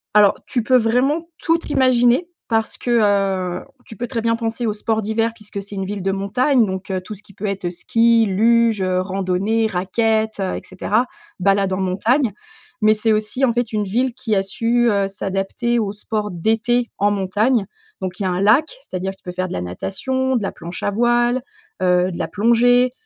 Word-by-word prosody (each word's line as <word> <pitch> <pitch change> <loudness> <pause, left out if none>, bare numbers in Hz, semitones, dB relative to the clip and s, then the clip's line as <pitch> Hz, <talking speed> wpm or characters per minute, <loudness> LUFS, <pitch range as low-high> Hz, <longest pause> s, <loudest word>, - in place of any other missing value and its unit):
Alors, 210 -1 +5
tu 245 - -1
peux 255 +1 +4
vraiment 265 +8 +1
tout 330 0 +2
imaginer 255 +4 +3 0.2
parce 225 -2 -1
que, 245 - -3 0.7
heu, - - -15 0.2
tu 220 - -11
peux 240 - -3
très 235 -3 -3
bien 230 0 +1
penser 230 0 -2
au 210 - 0
sport 220 +1 -1
d'hiver 225 +2 0
puisque 210 -3 -8
c'est 200 +1 -11
une 195 -1 -3
ville 200 -1 -5
de 195 - +1
montagne 225 +6 +2
donc 190 +1 -5
heu, 185 -1 -1
tout 210 +3 -8
ce 205 - -16
qui 200 - -17
peut 210 - -6
être 195 -3 -2
ski, 230 +5 +3
luge, 225 +1 +3
heu, 185 -1 +1
randonnée, 195 +4 0
raquettes, 220 +3 0
heu, 190 -1 -1
et - - -5
cetera, 215 +6 -1 0.3
balade 195 0 +2
en - - -1
montagne, 220 +7 +1 0.5
mais 215 0 +5
c'est 220 +1 0
aussi, 215 +5 -1
en 235 - +1
fait, 240 -1 -1
une 210 -1 0
ville 245 +6 0
qui 225 -3 -2
a 195 - +2
su, 235 +4 +1
heu, 200 -1 +1
s'adapter 195 +5 -2
au 205 -2 -2
sport 210 0 -3
d'été 225 +6 0
en 205 +1 +3
montagne, 205 +3 +1 0.4
donc 185 -1 -4
il 200 - -2
y - - -1
a 185 - +1
un 180 +1 -1
lac. 225 +10 +5 0.2
C'est-à-dire 190 - -4
tu - - -35
peux 180 - -5
faire 185 +1 -2
de - - -6
la - - -3
natation, 260 - -2
de 220 - 0
la - - -2
planche 170 +1 -8
à 205 - +1
voile, 240 +3 +2 0.4
heu, 180 0 +3
de 170 - -6
la 165 - -1
plongée, 235 +5 +3
215 Hz, 210 wpm, -20 LUFS, 195-235 Hz, 0.7 s, Alors